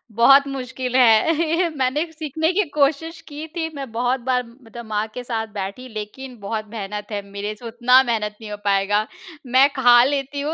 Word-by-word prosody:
बहुत 275 +5 +6
मुश्किल 255 -2 -5
है। 320 +8 +3
मैंने 265 +4 +1
भी 330 - -17
सीखने 315 +1 -1
की 415 - +2
कोशिश 305 +3 0
की 300 +1 -7
थी। 325 -2 -1
मैं 270 -4 -6
बहुत 245 +3 0
बार 250 0 0
मतलब 235 -1 -12
माँ 215 0 -2
के 250 - -6
साथ 225 -2 -3
बैठी, 200 +6 -5
लेकिन 240 +4 -7
बहुत 215 +2 -4
मेहनत 210 -1 -6
है, 205 -1 -2
मेरे 200 +1 -5
से 235 - -14
उतना 240 +3 +4
मेहनत 215 -4 -2
नहीं 215 -1 -8
हो 210 - -5
पाएगा। 200 +2 +1 0.4
मैं 260 +3 +5
खा 245 -2 +6
लेती 280 +1 -1
हूँ 300 +3 -2
250 Hz, 190 wpm, -21 LUFS, 220-280 Hz, 0.4 s, बहुत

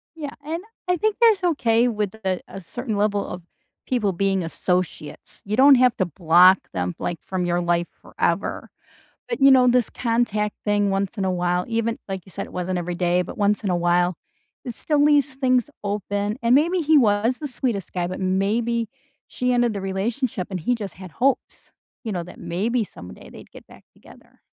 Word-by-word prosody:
Yeah, 295 -3 -6
and 325 +4 -4 0.2
I 360 0 +2
think 430 +4 0
that's 440 -5 +5
okay 245 -9 +2
with 210 -3 -2
a 185 -1 0
a 195 - -9
certain 225 +5 -5
level 205 0 +1
of 180 - -7 0.5
people 215 -6 0
being 195 +1 0
associates. 170 -2 -3
You 205 +2 -1
don't 275 +1 +8
have 250 -1 +4
to 185 - +1
block 175 +3 +5
them, 90 -1 -2
like, 175 - -3
from 185 -1 -3
your 175 0 +1
life 175 0 0
forever. - - -2 0.6
But, 475 - -3
you 275 0 +7
know, 255 -1 +6
this 245 -2 +3
contact 230 -3 0
thing 205 -1 +2
once 195 +2 -2
in 195 - 0
a 190 - +1
while, 180 0 0
even 230 0 -1
like 190 -1 -4
you - - -15
said, - - -4
it - - -15
wasn't 180 0 -2
every 175 0 -3
day, 175 0 +1
but 180 - -9
once 205 +1 +1
in 195 - 0
a 180 - +2
while, 175 +1 +2 0.5
it 245 - -4
still 295 +5 +1
leaves 290 -2 +3
things 255 -2 +1
open. 205 +1 -2
And 235 +1 +4
maybe 335 +6 +3
he 315 0 +4
was 225 -1 +3
the 295 - -4
sweetest 235 -7 -2
guy, 175 -1 -1
but 185 - -5
maybe 215 +5 0 0.4
she 250 0 -1
ended 240 -2 +2
the 200 - -3
relationship, 195 +2 -2
and 185 -2 -4
he 245 +10 +1
just 210 -4 -6
had 185 -1 -10
hopes, 270 +1 -1 0.3
you 220 - -3
know, 180 -2 -2
that 175 - -12
maybe 220 +7 -1
someday 90 - -12
they'd - - -13
get - - -14
back - - -17
together. - - -19
205 Hz, 200 wpm, -23 LUFS, 185-250 Hz, 0.6 s, don't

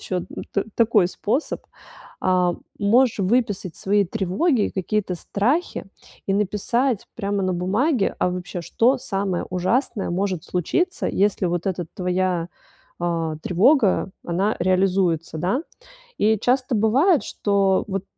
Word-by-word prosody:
еще 180 -2 -3 0.3
та 200 - 0
такой 220 -5 +4
способ, 240 +11 -2 0.6
а, 180 -1 +2 0.3
можешь 230 +3 +3
выписать 200 -3 0
свои 200 +1 +2
тревоги, 210 - 0
какие-то 190 0 -1
страхи 240 - -1 0.4
и 195 - +1
написать 210 +4 0
прямо 200 -2 -1
на 185 - 0
бумаге: 205 - +1
а - - +2
вообще, 180 0 -5
что 250 +9 +2
самое 195 -5 -2
ужасное 195 +3 0
может 185 -2 -1
случиться, 345 - -1
если 200 -1 +1
вот 175 +1 -2
эта 180 -3 -2
твоя, 180 -2 -1 0.5
а, 165 -2 -1
тревога, 200 - +3 0.2
она 190 +5 0
реализуется, 185 -3 +1
да? 195 - 0 0.6
И 220 0 +3
часто 255 +2 +1
бывает, 265 - +3
что 200 -2 +1
вот 195 -1 -3
195 Hz, 120 wpm, -22 LUFS, 180-225 Hz, 0.6 s, такой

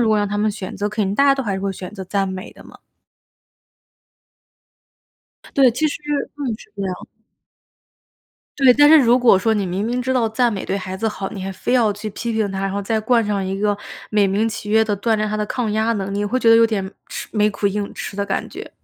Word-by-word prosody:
如 230 - +3
果 215 - +3
让 205 0 +1
他 205 - -2
们 215 +1 +2
选 200 -2 -7
择， 205 +1 -1
肯 210 0 -1
定 195 +1 -1
大 280 - +4
家 275 -1 +5
都 270 - -3
还 205 -5 -2
是 190 - -4
会 195 0 -2
选 185 0 -8
择 195 -2 -7
赞 195 +1 -1
美 185 0 -7
的 - - -15
嘛。 - - -15 2.8
对， 265 -3 +6
其 285 +7 0
实 - - -4 0.4
嗯， 285 - -4
是 215 - -17
这 200 - -4
样。 185 -1 -2 1.6
对， 265 -3 +7
但 290 0 +6
是 315 - +9
如 245 -1 +4
果 240 -6 +5
说 220 +3 +1
你 205 - 0
明 185 +3 -2
明 245 +1 -1
知 260 +1 -1
道 240 -3 +2
赞 235 +2 +1
美 195 - -4
对 195 - -2
孩 190 -1 -5
子 225 +3 -1
好， 195 -2 -4
你 195 -4 -7
还 195 - -4
非 190 - -3
要 230 -5 +3
去 210 +1 -6
批 235 +3 -4
评 220 -2 0
他， 195 0 -4
然 195 0 -2
后 200 +1 -2
再 220 +2 0
冠 230 +1 +2
上 205 -2 -1
一 190 +1 -3
个 205 0 +1 0.3
美 210 -2 +3
名 205 +4 +1
其 210 -1 -6
曰 220 +1 +4
地 210 -1 0
锻 225 +3 +1
炼 215 - -1
他 215 - -2
的 210 - -2
抗 235 0 -2
压 220 +2 +1
能 195 -3 -3
力， 200 - -2
你 205 - 0
会 240 +5 0
觉 230 -3 +4
得 225 - +8
有 230 0 +6
点 195 -4 -3 0.2
吃 - - -6
没 210 -1 +3
苦 205 0 -2
硬 200 0 -2
吃 200 - -6
的 200 - -1
感 195 - -2
觉。 - - -9
210 Hz, 275 characters per minute, -20 LUFS, 195-230 Hz, 2.8 s, 是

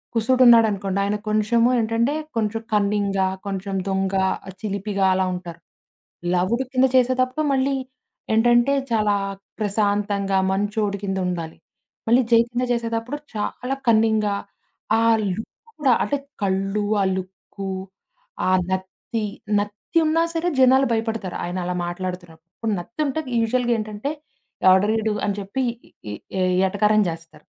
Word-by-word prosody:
కుశుడున్నాడనుకోండి. 225 -5 +4
ఆయన 205 +1 0
కొంచెము 215 +3 +3
ఏంటంటే 230 +4 +1 0.2
కొంచెం 225 0 -1
కన్నింగా, 200 -2 +1 0.2
కొంచెం 195 0 -3
దొంగ 190 0 0 0.5
చిలిపిగా 200 -1 -1
అలా 190 0 +1
ఉంటారు. 175 -2 -8 0.7
లవుడు 190 +8 +1
కింద 255 0 +4
చేసేతప్పుడు 255 +3 +2
మళ్ళీ 270 +1 +1 0.6
ఏంటంటే 240 +4 +4 0.2
చాలా 210 -2 +2 0.4
ప్రశాంతంగా 205 -1 0
మంచొడికిందుండాలి. 195 -4 -2 0.5
మళ్ళీ 240 +3 +5
జై 230 - +7
కింద 245 +1 -1
చేసేతప్పుడు 230 +3 -2 0.2
చాలా 250 +5 -3
కన్నింగ్‌గా. 220 -2 +3 0.6
ఆ - - +2 0.3
లుక్కు 225 - -8
కూడా 270 -4 +4
అంటే 285 - 0 0.3
కళ్ళు, 195 +2 0 0.2
ఆ - - +3
లుక్కు, 190 +1 -7 0.8
ఆ - - +3 0.2
నత్తి, 190 +4 -3 0.3
నత్తి 205 +11 -4
ఉన్నా 325 +2 +3
సరే 335 +1 0
జనాలు 260 +1 +6
భయపడతారు. 225 -4 -2
ఆయనలా 180 0 -3
మాట్లాడుతున్నప్పుడు. 175 -2 -7
ఇప్పుడు 225 -2 -2
నత్తింటే 275 - -3 0.2
యూజువల్‌గా 240 +1 +1
ఏంటంటే 215 +6 -4 0.6
ఎవడ్రా 190 +3 +5
ఈడు - - -1
ఇడు 215 -1 +1
అని 200 -1 -1
చెప్పి 200 +7 -3 0.5
ఈ - - -4 0.3
ఏ - - +1 0.3
ఎటకారం 210 +2 +3
జేస్తారు. 165 -2 -8
210 Hz, 115 wpm, -22 LUFS, 195-235 Hz, 0.8 s, జై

